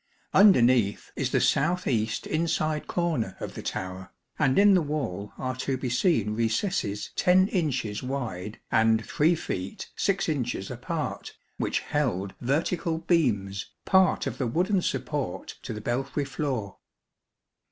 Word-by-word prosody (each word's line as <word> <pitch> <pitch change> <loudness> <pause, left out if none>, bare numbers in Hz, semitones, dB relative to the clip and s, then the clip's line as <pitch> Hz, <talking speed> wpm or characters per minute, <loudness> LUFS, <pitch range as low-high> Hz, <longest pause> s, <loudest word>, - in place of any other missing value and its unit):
Underneath 125 - +5
is - - -1
the - - +2
south 175 +5 +2
east 110 -3 0
inside 155 -1 0
corner 160 - -1
of - - -5
the - - -7
tower, 95 0 -5 0.3
and 135 -3 +3
in 205 0 +7
the 185 - +5
wall 130 - -3
are 130 -1 -3
to 130 0 -1
be 125 -1 -3
seen 120 - +2
recesses 115 - -1
10 185 +2 +4
incites 130 - -1
wide 115 -7 -4
and 110 0 +3
3 160 +4 +2
feet 95 - -5
6 195 0 +1
inches 125 - -2
apart, - - -4 0.2
which - - 0
held 100 -10 -1
vertical 160 +5 0
beams, 115 - 0 0.2
part 190 -1 +4
of - - -4
the 130 - 0
wooden 180 - +1
support 145 - -3
to - - -6
the 105 - -5
belfry 135 +5 -1
floor. 130 -7 -3
130 Hz, 140 wpm, -27 LUFS, 110-165 Hz, 0.3 s, in